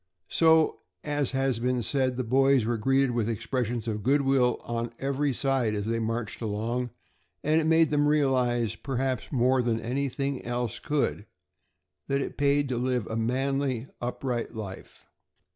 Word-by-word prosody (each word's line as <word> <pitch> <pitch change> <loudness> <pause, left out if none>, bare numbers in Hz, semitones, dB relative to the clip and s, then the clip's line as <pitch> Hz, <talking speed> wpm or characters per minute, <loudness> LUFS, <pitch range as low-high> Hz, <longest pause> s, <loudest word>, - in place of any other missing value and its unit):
So, 160 -1 +4 0.2
as 145 -3 0
has 135 -3 +1
been 125 0 0
said, 130 0 0
the 130 - 0
boys 135 0 +3
were 115 0 -1
greeted 135 +3 +2
with 115 -2 0
expressions 120 +1 -2
of 105 -2 -2
good 140 +6 +3
will 130 -3 +3
on 115 0 -3
every 140 +1 0
side 130 -4 0
as 105 -1 -2
they 115 +1 0
marched 115 0 -3
along, 115 +3 -2 0.5
and 155 +2 +3
it - - -2
made 160 -1 +4
them 145 0 +3
realize, 130 -6 +2
perhaps 130 -1 -2
more 130 -1 +3
than 115 -2 0
anything 135 +3 -2
else 120 -1 -3
could, 140 -8 -1 0.8
that 140 0 +1
it - - -4
paid 145 0 +2
to 125 -2 -1
live 125 -3 0
a 110 - -5
manly, 130 +2 -1
upright 120 -1 -3
life. 100 -4 -8
125 Hz, 160 wpm, -27 LUFS, 115-140 Hz, 0.8 s, So